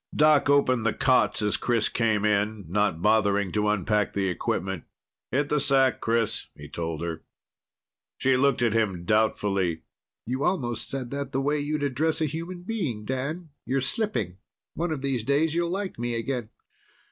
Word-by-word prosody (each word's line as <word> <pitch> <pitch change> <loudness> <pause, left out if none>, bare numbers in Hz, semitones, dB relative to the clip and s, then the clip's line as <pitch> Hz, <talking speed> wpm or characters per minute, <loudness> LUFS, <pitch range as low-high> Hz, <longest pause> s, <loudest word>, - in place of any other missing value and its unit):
Doc 150 -1 +5
opened 130 -4 +3
the 115 - +1
cots 130 -4 +3
as 105 - +1
Chris 115 -3 +1
came 110 -3 +1
in, 105 -1 +1
not 95 -2 0
bothering 100 -3 +3
to 105 0 +1
unpack 105 0 +1
the 95 -1 0
equipment. 90 0 -2 0.4
"Hit 145 +2 0
the 150 - +2
sack, 135 -2 +2
Chris," 115 -1 0
he 75 - -10
told 80 +1 -4
her. 80 -2 -4 1.0
She 130 0 +3
looked 135 -1 +2
at 115 -3 +2
him 100 -6 0
doubtfully. 100 -5 +1 0.4
"You 130 +4 -2
almost 125 -11 -1
said 130 -3 -4
that 140 -1 -4
the 135 - +1
way 145 +2 +1
you'd 145 +1 -2
address 145 +4 0
a 160 - +2
human 165 +4 -5
being, 160 - -3
Dan. 145 +7 -3
You're 135 +1 0
slipping. 135 - -2 0.3
One 170 0 -2
of 150 -4 -3
these 135 -5 0
days 145 +5 +2
you'll 170 0 0
like 190 - -3
me 120 0 -1
again." 115 -1 -3
120 Hz, 170 wpm, -26 LUFS, 105-145 Hz, 1.0 s, Doc